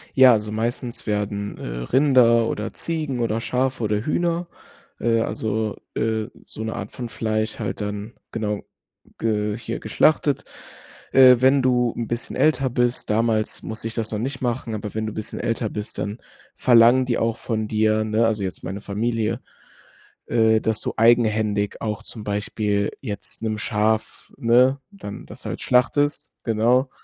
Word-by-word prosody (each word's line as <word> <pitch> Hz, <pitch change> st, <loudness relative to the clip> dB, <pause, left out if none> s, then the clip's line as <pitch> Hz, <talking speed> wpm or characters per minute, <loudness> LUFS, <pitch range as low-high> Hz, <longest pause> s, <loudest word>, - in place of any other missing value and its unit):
Ja, 130 Hz, -2 st, +8 dB
also 105 Hz, -1 st, -1 dB
meistens 120 Hz, +2 st, -3 dB
werden, 100 Hz, -1 st, -2 dB
äh, -, -, -8 dB, 0.2 s
Rinder 125 Hz, -, +4 dB
oder 110 Hz, +2 st, -4 dB
Ziegen 155 Hz, -6 st, -3 dB
oder 115 Hz, -1 st, 0 dB
Schafe 125 Hz, +1 st, -1 dB
oder 105 Hz, +1 st, 0 dB
Hühner, 170 Hz, +2 st, 0 dB, 0.5 s
äh, 115 Hz, 0 st, +2 dB
also, 110 Hz, -1 st, -2 dB, 0.2 s
äh, 110 Hz, 0 st, 0 dB, 0.2 s
so 110 Hz, -, -7 dB
'ne 110 Hz, -, -3 dB
Art 95 Hz, -, -6 dB
von 125 Hz, -, -6 dB
Fleisch 110 Hz, -1 st, -2 dB
halt -, -, -3 dB
dann 105 Hz, +2 st, -4 dB, 0.2 s
genau, 105 Hz, -2 st, -2 dB, 0.6 s
ge 105 Hz, -1 st, 0 dB
hier 115 Hz, 0 st, -5 dB
geschlachtet. 145 Hz, +5 st, +2 dB, 0.7 s
Äh, 130 Hz, -2 st, +7 dB
wenn 135 Hz, +2 st, +5 dB
du 125 Hz, -2 st, +2 dB
'n 115 Hz, -, -2 dB
bisschen 120 Hz, +2 st, -4 dB
älter 135 Hz, -4 st, +2 dB
bist- 120 Hz, -1 st, 0 dB
damals 110 Hz, 0 st, +1 dB
musste 110 Hz, +1 st, -4 dB
ich 115 Hz, -, -9 dB
das 115 Hz, -1 st, -2 dB
noch 105 Hz, -, -2 dB
nicht 130 Hz, +2 st, -3 dB
machen- 120 Hz, -2 st, -2 dB
aber 105 Hz, 0 st, -6 dB
wenn 110 Hz, 0 st, -2 dB
du 110 Hz, -, -4 dB
bisschen 110 Hz, 0 st, -5 dB
älter 115 Hz, -1 st, -1 dB
bist, 105 Hz, 0 st, -6 dB
dann 105 Hz, +3 st, -3 dB, 0.4 s
verlangen 120 Hz, +1 st, +5 dB
die 120 Hz, -2 st, 0 dB
auch 115 Hz, 0 st, 0 dB
von 110 Hz, -3 st, -2 dB
dir, 110 Hz, 0 st, +2 dB
ne, 110 Hz, +2 st, +1 dB
also 110 Hz, -3 st, 0 dB
jetzt 90 Hz, -4 st, -5 dB
meine 95 Hz, +3 st, -5 dB
Familie, 110 Hz, +2 st, -1 dB, 0.9 s
äh, 110 Hz, -1 st, +4 dB
dass 110 Hz, -1 st, -1 dB
du -, -, -3 dB
eigenhändig 110 Hz, -3 st, +3 dB
auch 105 Hz, -2 st, -3 dB
zum 110 Hz, -, -8 dB
Beispiel 105 Hz, 0 st, -1 dB
jetzt 105 Hz, -6 st, -5 dB
'nem 110 Hz, -1 st, -1 dB
Schaf 110 Hz, 0 st, -1 dB
ne, 125 Hz, +4 st, +4 dB
dann 185 Hz, -, -8 dB
das -, -, -12 dB
halt -, -, -4 dB
schlachtest, 145 Hz, +4 st, +2 dB
genau. 120 Hz, +4 st, +2 dB
115 Hz, 160 wpm, -23 LUFS, 105-125 Hz, 0.9 s, Ja